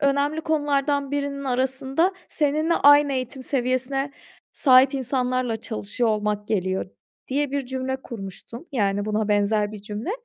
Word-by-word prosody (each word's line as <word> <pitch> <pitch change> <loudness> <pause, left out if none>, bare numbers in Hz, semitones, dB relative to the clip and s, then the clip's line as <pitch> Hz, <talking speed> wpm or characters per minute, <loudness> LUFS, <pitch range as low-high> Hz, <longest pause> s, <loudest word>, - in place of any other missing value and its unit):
"Önemli 285 +2 +1
konulardan 285 -3 0
birinin 280 -1 -2
arasında 265 +7 +1 0.2
seninle 310 +2 +1
aynı 290 0 +6
eğitim 260 0 -4
seviyesine 265 +2 -1 0.4
sahip 265 0 +5
insanlarla 255 -2 0
çalışıyor 225 +1 -2
olmak 210 -1 -1
geliyor." 190 -3 -1 0.4
diye 285 +1 0
bir 280 -2 -2
cümle 260 0 -3
kurmuştun, 230 - -9
yani, 205 -4 0
buna 215 0 -1
benzer 210 0 +1
bir 205 -2 -9
cümle. 210 - -5
260 Hz, 130 wpm, -24 LUFS, 215-280 Hz, 0.4 s, aynı